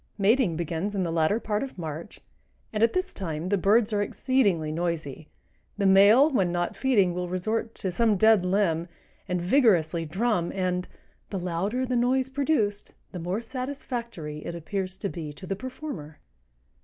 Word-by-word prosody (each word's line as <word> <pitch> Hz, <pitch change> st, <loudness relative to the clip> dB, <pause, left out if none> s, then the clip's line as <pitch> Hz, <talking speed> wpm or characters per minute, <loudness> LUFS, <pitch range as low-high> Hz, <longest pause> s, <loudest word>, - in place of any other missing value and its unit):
Mating 210 Hz, -2 st, +3 dB
begins 170 Hz, +5 st, -3 dB
in 190 Hz, -, 0 dB
the 170 Hz, -, -2 dB
latter 165 Hz, +6 st, +2 dB
part 210 Hz, -2 st, -1 dB
of 270 Hz, -6 st, -6 dB
March, 160 Hz, -1 st, -7 dB, 0.5 s
and 210 Hz, -, -1 dB
at 230 Hz, -, +4 dB
this 370 Hz, +1 st, -1 dB
time 165 Hz, -2 st, -4 dB
the 205 Hz, -, +3 dB
birds 210 Hz, +3 st, +3 dB
are 205 Hz, -, +2 dB
exceedingly 200 Hz, -, +1 dB
noisy. 160 Hz, -3 st, -3 dB, 0.5 s
The 200 Hz, -, 0 dB
male 200 Hz, +8 st, +7 dB
when 190 Hz, -10 st, +2 dB
not 175 Hz, 0 st, -1 dB
feeding 205 Hz, -10 st, +2 dB
will 180 Hz, 0 st, -3 dB
resort 220 Hz, +5 st, -2 dB
to 190 Hz, -, -3 dB
some 220 Hz, +2 st, +2 dB
dead 220 Hz, -1 st, +5 dB
limb 180 Hz, -3 st, +1 dB, 0.4 s
and 180 Hz, 0 st, -1 dB
vigorously 175 Hz, -, +3 dB
drum 190 Hz, +1 st, 0 dB
and 180 Hz, -1 st, -1 dB, 0.4 s
"the 200 Hz, -, -3 dB
louder 185 Hz, +8 st, -1 dB
the 250 Hz, 0 st, -1 dB
noise 255 Hz, +2 st, +2 dB
produced, 265 Hz, -7 st, -1 dB, 0.2 s
the 180 Hz, -, -6 dB
more 180 Hz, +7 st, -3 dB
satisfactory 235 Hz, -, -5 dB
it 170 Hz, -, -5 dB
appears 185 Hz, +2 st, -4 dB
to 200 Hz, -, -3 dB
be 165 Hz, -5 st, -6 dB
to 145 Hz, -, -11 dB
the 195 Hz, -, -2 dB
performer." 250 Hz, -, -7 dB
195 Hz, 170 wpm, -26 LUFS, 170-230 Hz, 0.5 s, male